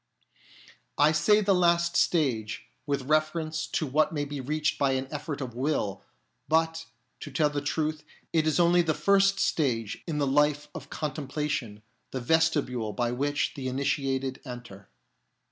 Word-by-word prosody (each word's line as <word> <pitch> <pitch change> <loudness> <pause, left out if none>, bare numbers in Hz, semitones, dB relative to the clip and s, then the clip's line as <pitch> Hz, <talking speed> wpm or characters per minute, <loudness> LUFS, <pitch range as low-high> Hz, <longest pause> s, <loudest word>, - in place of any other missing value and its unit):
I 150 +1 +5
say 160 +8 +4
the 200 -1 +3
last 170 -1 +3
stage, 125 -10 +1 0.2
with 140 -2 -1
reference 155 +2 0
to - - -1
what 150 +2 +2
may 145 -2 -2
be 145 -1 -5
reached 150 +3 -1
by 140 -2 +2
an 130 0 -2
effort 150 -1 -4
of 125 -3 -5
will; 120 -7 -1 0.5
but, 160 +1 +1 0.3
to - - -7
tell 145 +2 +1
the 145 -1 -2
truth, 155 +1 -2 0.3
it 160 -1 +2
is 155 - +2
only 175 +1 +5
the 160 -2 0
first 195 0 +3
stage 115 - 0
in 160 -3 -2
the 145 - +1
life 150 +2 +2
of - - -9
con 150 -2 -3
templation, 140 -7 -3 0.3
the 130 - -4
vestibule 130 -6 +1
by 120 -1 0
which 145 +4 -1
the 135 -3 -5
initiated 135 0 -1
enter. 120 -7 -10
145 Hz, 160 wpm, -28 LUFS, 130-160 Hz, 0.5 s, I